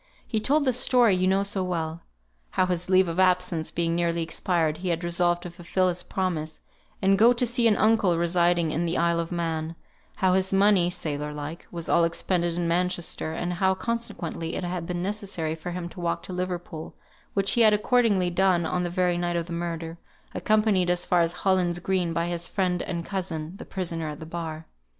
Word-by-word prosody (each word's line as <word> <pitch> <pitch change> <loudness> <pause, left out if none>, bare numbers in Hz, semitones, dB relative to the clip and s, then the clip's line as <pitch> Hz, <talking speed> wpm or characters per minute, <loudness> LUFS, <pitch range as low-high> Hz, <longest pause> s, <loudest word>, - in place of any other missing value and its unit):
He 220 - -1
told 285 +7 +2
the 260 - +3
story 240 -4 +4
you 185 0 +1
know 195 +1 +3
so 200 -1 -2
well: 165 -2 -3 0.5
how 185 - +1
his 180 -1 -2
leave 185 0 +5
of 165 +2 -3
absence 180 -3 +2
being 170 -1 -1
nearly 170 -1 0
expired, 160 -2 -1
he 185 0 -3
had 170 0 -1
resolved 175 0 +1
to 175 - -7
fulfil 180 +1 0
his 175 0 -2
promise, 165 -5 -3 0.4
and 195 0 +4
go 235 +3 +7
to 245 +1 +1
see 240 0 +2
an 215 - +3
uncle 215 -6 +3
residing 170 -1 +2
in 170 +3 -1
the 170 - 0
Isle 170 0 +2
of 165 +1 -3
Man; 165 -1 -2 0.4
how 185 -1 +2
his 190 0 +1
money 195 -2 +4
(sailor 150 -4 -3
like) 150 +3 -7
was 170 -2 -5
all 170 - +4
expended 170 0 0
in 175 -1 -1
Manchester, 175 -2 -1
and 175 +1 -2
how, 190 +2 +2
consequently, 205 -7 -4
it - - -3
had 175 -1 -3
been 175 -1 -3
necessary 195 -6 -3
for 160 +2 -6
him 175 0 -4
to 180 - -12
walk 170 -1 -1
to 185 - -7
Liverpool, 180 -3 -5 0.4
which 195 -1 +2
he 235 - +3
had 220 -1 +7
accordingly 210 -5 +2
done 180 -1 +2
on 180 +2 -1
the 175 - -1
very 180 0 +1
night 175 0 -1
of 170 -1 -1
the 170 - -7
murder, 170 -1 -4 0.3
accompanied 215 -4 +2
as 175 0 +1
far 175 -1 +3
as 165 0 +2
Hollins 180 -2 +1
Greeb 180 -1 0
by 170 0 0
his 175 0 -3
friend 180 -2 0
and 170 -2 -4
cousin, 175 -4 -4
the - - -9
prisoner 165 -4 -3
at 150 0 -7
the 160 - -8
bar. 160 -1 -6
175 Hz, 205 wpm, -26 LUFS, 170-190 Hz, 0.5 s, go